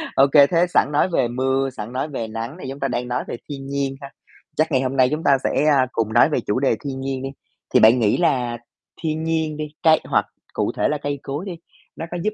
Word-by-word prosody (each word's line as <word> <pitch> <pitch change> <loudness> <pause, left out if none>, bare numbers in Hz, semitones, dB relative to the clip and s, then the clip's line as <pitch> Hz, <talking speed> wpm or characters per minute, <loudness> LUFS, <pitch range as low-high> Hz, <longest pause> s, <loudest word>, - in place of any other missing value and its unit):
Ô 135 +1 +6
kê, 145 -2 +7
thế 170 +1 +3
sẵn 150 - +2
nói 150 +5 +2
về 130 -8 +1
mưa, 130 +2 0
sẵn 110 -3 -8
nói 135 +4 -2
về 115 -5 -4
nắng 115 +8 -6
thì 130 - -5
chúng 140 - -8
ta 135 - 0
đang 125 -1 -3
nói 125 +1 -2
về - - -5
thiên 135 -1 -6
nhiên 140 -1 -2
ha, 140 0 -9 0.5
chắc 155 +1 +1
ngày 130 -1 +2
hôm 135 +1 -2
nay 130 -1 +5
chúng 155 +2 -2
ta 140 -1 +4
sẽ, - - +1
a, 140 -4 +4
cùng 110 -1 -1
nói 120 +6 +5
về 150 - 0
chủ 105 +5 +1
đề 135 - +1
thiên 135 -2 -4
nhiên 135 -1 -3
đi, 135 - -3 0.4
thì - - +6
bạn 115 +3 +6
nghĩ 105 -2 +2
là 125 -8 +1 0.5
thiên 160 0 -1
nhiên 160 -2 -1
đi, 155 - -3 0.2
cây 160 -1 +6
hoặc - - +1 0.3
cụ - - -1
thể - - +2
là 150 - 0
cây 145 -1 -4
cối 145 +7 -4
đi, 185 - -5 0.4
nó 165 - -5
có 175 - -3
giúp 215 - 0
135 Hz, 265 wpm, -21 LUFS, 130-150 Hz, 0.5 s, kê